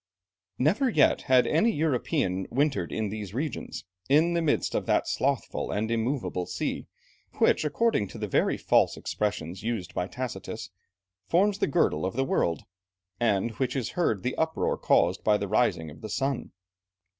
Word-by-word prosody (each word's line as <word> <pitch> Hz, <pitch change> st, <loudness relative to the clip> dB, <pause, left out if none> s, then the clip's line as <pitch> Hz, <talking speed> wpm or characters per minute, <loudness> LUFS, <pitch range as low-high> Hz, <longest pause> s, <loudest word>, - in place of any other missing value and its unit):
] 90 Hz, +1 st, -66 dB
Never 195 Hz, -, +2 dB
yet -, -, +3 dB
had 130 Hz, -1 st, +6 dB
any 220 Hz, +10 st, +3 dB
European 135 Hz, -, 0 dB
wintered 135 Hz, -, 0 dB
in 110 Hz, -2 st, -2 dB
these 105 Hz, -1 st, -6 dB
regions, 145 Hz, 0 st, -4 dB, 0.2 s
in 160 Hz, +5 st, +4 dB
the 170 Hz, -, +1 dB
midst 160 Hz, -3 st, +1 dB
of -, -, -1 dB
that -, -, +2 dB
slothful -, -, -1 dB
and 110 Hz, +2 st, -1 dB
immovable 115 Hz, -6 st, -1 dB
sea, -, -, -3 dB, 0.5 s
which -, -, +3 dB
according 150 Hz, -, +1 dB
to -, -, -10 dB
the -, -, -3 dB
very -, -, +1 dB
false -, -, +2 dB
expressions 95 Hz, -4 st, -3 dB
used 110 Hz, -5 st, -3 dB
by 90 Hz, -, -2 dB
Tacitus, 110 Hz, -6 st, -6 dB, 0.6 s
forms 200 Hz, +4 st, +2 dB
the -, -, +2 dB
girdle 80 Hz, -, +1 dB
of 95 Hz, +3 st, -2 dB
the 135 Hz, +1 st, +1 dB
world, 85 Hz, -, 0 dB, 0.6 s
and 110 Hz, -2 st, +2 dB
in -, -, -14 dB
which 130 Hz, -1 st, -1 dB
is 125 Hz, -4 st, -1 dB
heard 115 Hz, -, 0 dB
the 125 Hz, -, -1 dB
uproar 160 Hz, 0 st, 0 dB
caused 90 Hz, +2 st, +2 dB
by 105 Hz, -1 st, +4 dB
the 100 Hz, -, -3 dB
rising 95 Hz, -7 st, +1 dB
of 75 Hz, +1 st, -14 dB
the 110 Hz, -, -6 dB
sun. 135 Hz, +3 st, -2 dB
120 Hz, 170 wpm, -27 LUFS, 100-145 Hz, 0.6 s, had